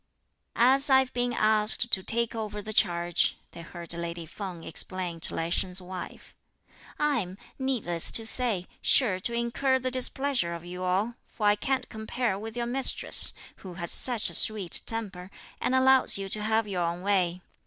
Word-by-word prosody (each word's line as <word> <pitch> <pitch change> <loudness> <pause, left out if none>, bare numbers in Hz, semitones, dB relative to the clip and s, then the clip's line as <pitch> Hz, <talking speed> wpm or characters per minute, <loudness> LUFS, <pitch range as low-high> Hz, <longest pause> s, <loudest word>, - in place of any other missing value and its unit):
"As 265 +4 +5
I've 265 -1 +3
been 245 0 -1
asked 215 +1 +2
to 190 - +2
take 235 +4 -2
over 215 -2 -5
the 215 +1 -5
charge," 175 -2 +1
they 170 - -11
heard 170 0 -9
lady 170 0 -6
Feng 175 0 -8
explain 175 0 -1
to - - -5
Lai 165 +1 -3
Sheng's 180 +1 -1
wife, 185 0 -10 0.6
"I'm, 235 -12 -1 0.2
needless 225 -11 +2
to 225 - +4
say, 225 -6 +1
sure 210 -9 +3
to 235 +5 -3
incur 235 +3 0
the 255 0 -4
displeasure 255 -7 -1
of 170 0 -10
you 180 +1 -8
all, 195 +6 -1
for 215 - -6
I 205 0 +4
can't 265 +5 -2
compare 220 -1 -3
with 225 +2 -8
your 240 - -2
mistress, 255 +2 +1 0.3
who 185 -3 -11
has 170 -1 -1
such 240 -4 +4
a - - -7
sweet 205 -6 +4
temper, 195 -5 -3 0.3
and 260 - 0
allows 260 -2 +4
you 195 0 -5
to 210 - -3
have 220 0 0
your 185 -3 -3
own 170 +1 -3
way. 180 -3 0
210 Hz, 175 wpm, -27 LUFS, 180-240 Hz, 0.6 s, As